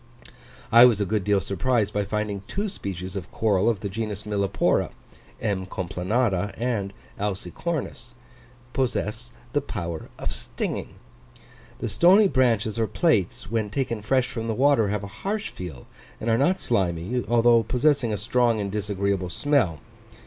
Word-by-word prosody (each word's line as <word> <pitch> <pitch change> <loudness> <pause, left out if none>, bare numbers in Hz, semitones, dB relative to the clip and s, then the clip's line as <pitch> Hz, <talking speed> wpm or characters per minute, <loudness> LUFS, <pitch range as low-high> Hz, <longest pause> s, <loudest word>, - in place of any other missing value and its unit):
I 115 +1 +9
was 115 -4 +4
a 100 - +1
good 105 0 0
deal 100 +1 +3
surprised 100 +4 0
by 105 0 0
finding 105 -1 -2
two 205 +2 -2
species 95 - -6
of 90 -3 -6
coral 105 -1 +2
of 110 -5 -1
the 100 - -2
genus 105 0 -4
Millepora 100 -2 +1 0.5
(M. 95 -4 -2
complanata 95 +2 -1
and 115 -5 -1 0.3
alcicornis), 115 - -4 0.6
possessed 120 -3 -1
of 120 - -24 0.2
the 145 - +2
power 85 - -5
of - - -3
stinging. - - -4 0.8
The - - -3
stony 180 - +6
branches 115 - +1
or 110 - +2
plates, 105 - 0
when 110 -2 0
taken 115 -1 -2
fresh 130 +4 +2
from 115 -2 -5
the 110 - -1
water, 135 -4 +4
have 105 0 -2
a 100 +2 -9
harsh 210 +2 -2
feel 80 -9 -8 0.3
and 115 - -1
are - - +4
not 175 +7 +3
slimy, 95 +2 0
although 120 0 +5
possessing 125 +1 +2
a 105 - -1
strong 120 +2 +2
and 100 -1 -2
disagreeable 100 -2 -1
smell. 105 - +1
110 Hz, 155 wpm, -25 LUFS, 100-125 Hz, 0.8 s, I